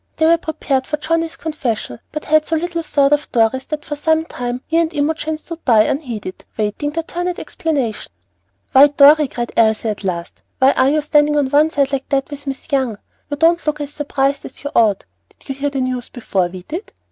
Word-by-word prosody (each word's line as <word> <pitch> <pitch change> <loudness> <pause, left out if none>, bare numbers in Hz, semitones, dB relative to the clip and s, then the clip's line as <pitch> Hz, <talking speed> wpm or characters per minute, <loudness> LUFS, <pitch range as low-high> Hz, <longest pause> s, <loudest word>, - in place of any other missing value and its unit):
They 315 - +3
were 335 +1 +5
prepared 280 -4 -2
for 300 - -1
Johnnie's 330 +2 -1
confession, 245 - -3
but 305 - -5
had 310 0 +4
so 325 - -1
little 335 +1 -2
thought 285 -2 +2
of 295 0 0
Dorry's 240 +2 +2
that 300 -1 -4
for 295 - -4
some 320 +2 +1
time 245 -4 -4
he 325 - 0
and 335 -1 +2
Imogen 310 +1 -1
stood 335 +1 -9
by 225 -4 +5
unheeded, 230 -9 -4
waiting 215 +7 -1
their 330 +2 -3
turn 350 +2 -4
at 360 - -2
explanation. 275 -9 -3 0.6
"Why, 275 +2 +8
Dorry," 290 +1 +6
cried 240 -2 -4
Elsie 220 0 +3
at 210 -1 -4
last, 175 -3 -4 0.2
"why 265 +1 +5
are 260 0 +3
you 305 +1 +1
standing 295 0 +3
on 275 -2 +1
one 300 +2 +4
side 280 -3 0
like 270 -1 -3
that 275 +1 0
with 285 0 -7
Miss 270 +1 -6
Young? 260 -6 0 0.3
You 290 - -3
don't 335 +2 +3
look 300 0 0
as 290 0 -5
surprised 280 -1 -1
as - - -11
you 285 - -4
ought. 210 -4 +3 0.2
Did - - -22
you - - -1
hear 280 +2 -2
the 275 -2 -2
news 255 -1 -3
before 195 -7 -1
we 180 0 -10
did? 340 - -7
285 Hz, 215 wpm, -18 LUFS, 255-310 Hz, 0.6 s, Why